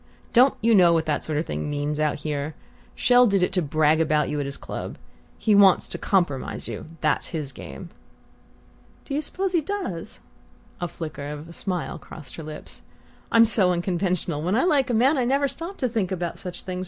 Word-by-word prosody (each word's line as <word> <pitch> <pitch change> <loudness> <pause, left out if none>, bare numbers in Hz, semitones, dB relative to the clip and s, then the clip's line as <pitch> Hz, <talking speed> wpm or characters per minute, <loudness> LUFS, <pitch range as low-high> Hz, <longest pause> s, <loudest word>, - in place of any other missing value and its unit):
Don't 255 +3 +6
you 230 +1 +4
know 180 -4 +6
what 165 -1 +1
that 150 - -1
sort 155 -2 -1
of 155 - 0
thing - - -3
means 145 +1 -2
out 150 -1 0
here? 150 0 -3 0.4
Chelles 245 -1 +5
did 195 -2 +2
it 180 - 0
to 185 - +2
brag 155 +1 +2
about 150 -1 +2
you 150 - -2
at 140 - -2
his 140 - -5
club. - - -6 0.4
He 215 - +2
wants 200 -2 +6
to - - -3
compromise 175 -9 0
you 115 +4 -6
that's 155 - +1
his 150 -5 -4
game!" 170 +6 -10 1.1
"Do 280 - -6
you 290 - 0
suppose 375 +5 -3
he 345 -3 +2
does?" 400 +4 -5 0.6
A 175 - 0
flicker 155 -4 -6
of 150 +2 -7
a - - -10
smile 180 -1 -3
crossed 150 -6 -11
her 165 - -6
lips. 150 0 -9 0.5
"I'm 230 0 +7
so 200 -5 +4
unconventional: 175 -3 -1
when 180 +6 0
I 250 - +3
like 290 -7 +3
a 240 - +1
man 265 +6 +4
I - - +2
never 275 +3 +2
stop 335 +8 -6
to 255 - 0
think 220 -6 -1
about 175 -2 -3
such 180 -1 -7
things. 185 -1 -4
180 Hz, 205 wpm, -24 LUFS, 155-235 Hz, 1.1 s, I'm